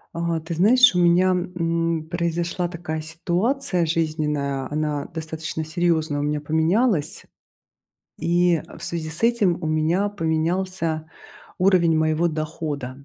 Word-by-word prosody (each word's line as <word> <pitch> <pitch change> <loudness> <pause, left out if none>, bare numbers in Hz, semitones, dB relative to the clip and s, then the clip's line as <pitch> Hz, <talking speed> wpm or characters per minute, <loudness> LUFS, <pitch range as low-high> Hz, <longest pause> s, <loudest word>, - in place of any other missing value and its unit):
А. 170 -1 -1
Ты 165 +2 -5
знаешь, 240 +9 +6
у 180 - +1
меня, 175 +2 +4
м, 170 -3 -1
произошла 170 +1 -1
такая 170 -2 -5
ситуация 175 - -1
жизненная. 150 -4 -1
Она 150 -1 -1
достаточно 160 -1 -5
серьезно 160 -3 0
у - - -1
меня 150 +1 -1
поменялась. 160 - +1 1.0
И, 175 -1 +2
э, - - -13
в - - -12
связи 160 -2 -4
с 160 +5 -4
этим 225 -7 +2
у - - -2
меня 160 +6 +1
поменялся 165 -2 -1 0.5
уровень 180 -3 +4
моего 155 +2 +2
дохода. 150 -4 -5
165 Hz, 130 wpm, -23 LUFS, 155-175 Hz, 1.0 s, знаешь